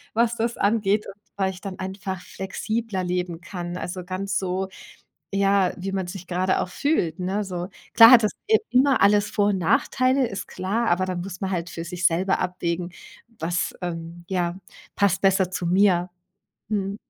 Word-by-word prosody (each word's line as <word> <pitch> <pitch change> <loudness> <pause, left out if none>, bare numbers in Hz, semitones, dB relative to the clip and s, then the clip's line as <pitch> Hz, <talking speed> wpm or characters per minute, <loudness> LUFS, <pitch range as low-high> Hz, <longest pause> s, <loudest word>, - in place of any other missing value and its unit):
was 235 +1 +2
das 235 +1 -1
angeht 205 0 +2
und - - -7 0.2
weil 190 -1 0
ich 185 - -12
dann 195 -2 -6
einfach 190 0 -4
flexibler 190 +2 -3
leben 180 -1 -2
kann. 175 -1 -6
Also, 180 0 -5
ganz 190 +1 -1
so, 190 0 -2 0.7
ja, 195 -1 +3
wie 190 +2 -4
man 190 -2 -2
sich 180 0 -8
grade 185 +1 +1
auch - - -2
fühlt, 180 - 0
ne, 190 +3 -1
so. 180 -2 -4 0.3
Klar 230 +1 +10
hat 240 -2 +9
das, 215 - +2 0.2
äh, 440 0 +5
immer 265 +1 +4
alles 205 +1 +4
Vor 205 - +2
und 200 -2 +1
Nachteile, 255 +9 +2
ist 195 - -5
klar, 220 +5 -1
aber 180 +2 +2
da 185 -1 -3
muss 180 +1 -6
man 190 - -2
halt 175 -2 -2
für 165 - -6
sich 180 +1 0
selber 185 +4 +1
abwägen, 175 -1 -2 0.5
was, 170 +2 -1
ähm, 170 0 -6
ja, 175 -2 -1 0.4
passt 195 -3 +2
besser 190 -1 +3
zu 180 -1 -3
mir. 180 -1 +3 0.6
Mhm. 200 -2 -1
190 Hz, 180 wpm, -24 LUFS, 180-205 Hz, 0.7 s, Klar